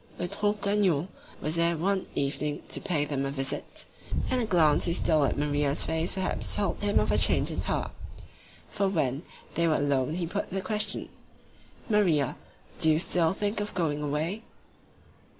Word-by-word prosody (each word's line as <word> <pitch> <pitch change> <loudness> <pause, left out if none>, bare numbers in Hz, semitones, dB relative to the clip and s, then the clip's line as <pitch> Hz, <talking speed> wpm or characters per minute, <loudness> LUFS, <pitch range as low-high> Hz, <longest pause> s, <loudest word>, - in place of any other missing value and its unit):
Eutrope 205 +4 -1
Gagnon 195 -5 +2 0.3
was 155 - -1
there 170 0 +3
one 190 +3 0
evening 145 +1 -1
to - - 0
pay 165 -7 0
them 140 -2 -2
a 135 - -1
visit, 135 -1 -3 0.5
and 255 - +2
a - - 0
glance 160 -7 +4
he 170 - +1
stole 155 -4 +3
at - - -1
Maria's 145 0 +1
face 160 +2 0
perhaps 190 -1 -1
told 200 -3 -1
him 205 0 +2
of - - +1
a - - +3
change - - +2
in - - -2
her, - - -2 0.8
for 200 -1 0
when, 145 -7 0 0.3
they 170 0 +2
were 155 - +3
alone 140 +1 +1
he 175 -1 -1
put 165 - -3
the 195 - -2
question: 210 +2 -3 0.8
"Maria, 175 - +2 0.4
do 160 - +5
you 155 - +4
still 165 -1 +4
think 205 +3 -2
of 205 0 -4
going 155 -5 0
away?" 155 +8 -2
165 Hz, 170 wpm, -28 LUFS, 145-195 Hz, 0.8 s, do